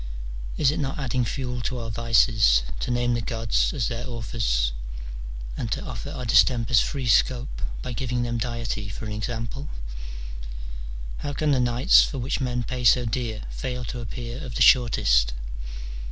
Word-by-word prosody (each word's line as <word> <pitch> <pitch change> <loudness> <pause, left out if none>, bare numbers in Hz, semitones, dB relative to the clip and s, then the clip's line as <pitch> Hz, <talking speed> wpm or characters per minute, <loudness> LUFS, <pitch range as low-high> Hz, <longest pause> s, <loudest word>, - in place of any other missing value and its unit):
Is 140 -2 +4
it 150 - -2
not 135 -2 -2
adding 130 -3 0
fuel 125 0 -3
to 125 +1 -2
our 115 -2 -4
vices 110 - +4 0.2
to - - -2
name 120 0 +2
the 120 - 0
gods 115 -1 +1
as 125 -7 0
their 120 +2 -4
authors, 110 - 0 0.8
and 110 - -3
to - - -4
offer 125 +3 -5
our 135 -4 -5
distempers 115 0 +5
free 135 -3 -2
scope 125 +2 +2 0.2
by 125 - -4
giving 125 0 -1
them 120 0 -1
deity 115 -3 -3
for 100 - -6
an 105 - -4
example? 115 +6 -4 1.5
How 145 - -4
can 150 +2 +1
the 135 - +3
nights 120 +1 +6
for 140 - -3
which 130 +2 -1
men 125 -1 0
pay 125 +2 -4
so 120 +1 +6
dear 110 -1 -2
fail 125 -2 -4
to 125 - -5
appear 120 +4 -6
of 125 - -6
the - - +4
shortest - - +5
120 Hz, 170 wpm, -25 LUFS, 115-125 Hz, 1.5 s, nights